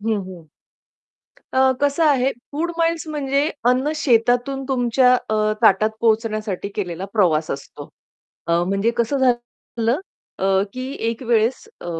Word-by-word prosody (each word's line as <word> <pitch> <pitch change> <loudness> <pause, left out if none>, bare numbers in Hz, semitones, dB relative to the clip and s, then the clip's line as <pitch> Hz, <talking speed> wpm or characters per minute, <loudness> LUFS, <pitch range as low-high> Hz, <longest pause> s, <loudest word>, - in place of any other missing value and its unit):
हं, 220 0 0
हं. 175 -4 -11 1.1
अ, 260 0 +4
कसं 285 +3 +2
आहे 270 -3 +3 0.2
फूड 335 +4 -2
माईल्स 330 -1 0
म्हणजे 280 -2 0 0.3
अन्न 260 +4 +2
शेतातून 245 -1 +1
तुमच्या 250 0 +3
अ, 220 -3 -2 0.3
ताटात 215 +1 +4
पोहोचण्यासाठी 215 -3 0
केलेला 180 -2 -4
प्रवास 165 -7 +2
असतो. 140 0 -7 0.6
अ, 170 - 0 0.2
म्हणजे 195 +3 +1
कसं 235 +4 0
झालेलं 240 +1 -1 0.4
अ, - - -2 0.3
की 255 +1 -5 0.2
एक 230 +2 -4
वेळेस 235 - 0
अ, - - -9
240 Hz, 130 wpm, -21 LUFS, 215-270 Hz, 1.1 s, अ